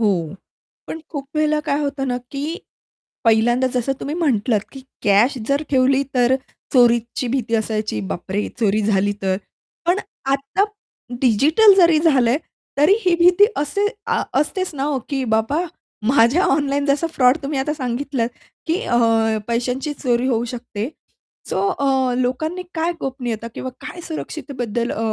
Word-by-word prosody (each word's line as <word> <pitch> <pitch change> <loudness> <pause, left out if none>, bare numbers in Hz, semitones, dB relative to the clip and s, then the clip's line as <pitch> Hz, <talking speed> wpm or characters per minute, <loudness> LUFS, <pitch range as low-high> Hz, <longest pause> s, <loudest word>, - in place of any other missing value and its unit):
हो. 180 -7 0 0.5
पण 325 - -6
खूप 280 -4 -6
वेळेला 305 0 +2
काय 280 - +1
होतं 280 -2 -2
ना, 245 - 0
की 290 +4 -3 0.7
पहिल्यांदा 240 +3 +3
जसं 250 +2 0
तुम्ही 290 +3 -3
म्हटलात, 245 -9 +1
की 270 - -9 0.2
कॅश 210 +7 +4
जर 280 +2 +1
ठेवली 265 0 +3
तर 250 +1 +4 0.4
चोरीची 240 -1 +3
भीती 235 -3 -1
असायची, 215 - -1
"बापरे! 185 - -3
चोरी 215 -1 +2
झाली 205 -1 +2
तर?" 190 -1 +1 0.5
पण 355 +3 +3 0.3
आता 275 +8 +1 0.6
डिजिटल 305 - +5
जरी 335 -4 +6
झालंय, 270 -6 +3 0.4
तरी 300 +7 +6
ही 360 -2 +4
भीती 355 +3 +6
असे 300 +8 0 0.2
अ, - - +1 0.2
असतेच 370 +3 -2
ना 270 - -3
हो, 280 -1 0
की 270 -2 -1
बाबा 280 +10 +1 0.4
माझ्या 265 - +4
ऑनलाईन 285 -4 +1
जसा 285 +4 +2
फ्रॉड 255 -1 +4
तुम्ही 280 0 -2
आता 285 +3 -1
सांगितलंत 255 -2 -2 0.4
की 335 +3 0
अ, 240 - +1 0.5
पैशांची 250 +5 -1
चोरी 245 -1 +1
होऊ 235 -2 +1
शकते, 235 -2 -5 0.6
सो - - 0
अ, 265 -7 +1
लोकांनी 310 +8 -1
काय 330 +1 0
गोपनीयता 240 -4 -4
किंवा 260 - -5 0.2
काय 355 - -7
सुरक्षितेबद्दल 250 -7 -4
अ, - - -5
265 Hz, 145 wpm, -20 LUFS, 235-300 Hz, 0.7 s, जरी